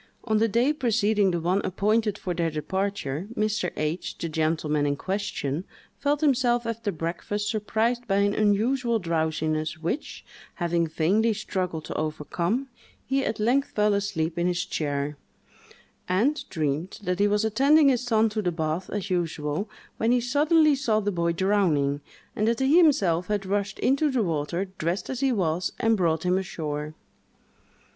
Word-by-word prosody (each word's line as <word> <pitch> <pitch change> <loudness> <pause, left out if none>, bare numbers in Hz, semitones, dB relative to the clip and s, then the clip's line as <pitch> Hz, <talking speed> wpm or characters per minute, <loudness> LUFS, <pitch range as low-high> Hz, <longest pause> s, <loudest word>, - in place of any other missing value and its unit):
On 220 -2 +1
the 225 - +3
day 240 +7 +2
preceding 220 -7 +2
the 175 -2 0
one 180 +4 +1
appointed 210 +2 +1
for 180 - -3
their 170 -1 0
departure, 175 0 -3
Mr. 210 -4 0
H——, 155 +3 -3
the 165 - -4
gentleman 155 -2 0
in 145 - +1
question, 175 -4 -3 0.4
felt 290 +1 0
himself 245 -5 +2
after 230 -2 -2
breakfast 175 +5 -3
surprised 225 +3 0
by 195 - +1
an 200 0 +2
unusual 230 +4 +2
drowsiness, 160 -3 -1
which, 165 - -4 0.3
having 170 -2 0
vainly 200 +9 +2
struggled 185 -6 -3
to - - -5
overcome, 170 - -2 0.4
he 270 +1 0
at 220 - -2
length 250 +6 +2
fell 210 0 +3
asleep 175 -5 -1
in 175 - +1
his 180 0 0
chair, 145 -4 -2 0.9
and 240 +12 +1
dreamed 155 +2 -2
that 180 -1 -1
he 205 - +4
was 210 +1 +1
attending 280 +7 +5
his 250 -3 +2
son 225 -3 +2
to 215 0 -2
the 180 -3 0
bath 160 +2 -2
as 200 -1 -4
usual, 165 +1 -1 0.3
when 225 +1 +1
he 250 - +4
suddenly 300 +5 +3
saw 245 -6 +1
the 205 -1 -1
boy 170 -2 0
drowning, 165 -7 +1 0.3
and 215 - 0
that 230 0 +1
he 265 +3 +3
himself 195 - +3
had 205 -2 -1
rushed 200 +1 -1
into 280 +3 +2
the 255 -5 +1
water, 170 +2 -1
dressed 170 +9 -2
as 260 - -4
he 270 -1 +2
was, 180 -5 0
and 225 -1 +3
brought 165 -5 +1
him 180 +1 +2
ashore. 155 -5 -4
200 Hz, 165 wpm, -26 LUFS, 165-225 Hz, 0.9 s, attending